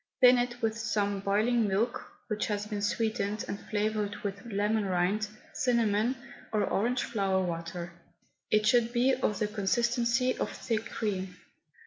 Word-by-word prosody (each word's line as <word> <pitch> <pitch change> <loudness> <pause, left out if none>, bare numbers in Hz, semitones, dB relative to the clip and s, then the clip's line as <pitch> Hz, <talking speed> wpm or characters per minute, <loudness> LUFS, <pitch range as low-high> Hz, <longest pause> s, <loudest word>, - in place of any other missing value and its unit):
Thin 250 -1 +7
it 245 0 -3
with 220 -1 +1
some 210 -3 0
boiling 215 +4 +2
milk 215 +5 0 0.2
which 215 -1 -1
has 205 -1 -2
been 210 -1 -4
sweetened 210 0 -1
and 200 - -4
flavoured 210 -1 0
with 200 0 -4
lemon 210 +2 +1
rind, 190 +3 +1 0.3
cinnamon, 235 -1 +2 0.4
or 215 -1 +2
orange 240 +5 0
flower 195 -4 0
water. 170 0 -4 0.6
It 215 0 +3
should 235 +1 +3
be 255 +2 +3
of 240 -5 0
the 210 - 0
consistency 235 +4 +1
of - - 0
thick 225 -1 -2
cream. 190 -4 -3
215 Hz, 145 wpm, -30 LUFS, 200-235 Hz, 0.6 s, Thin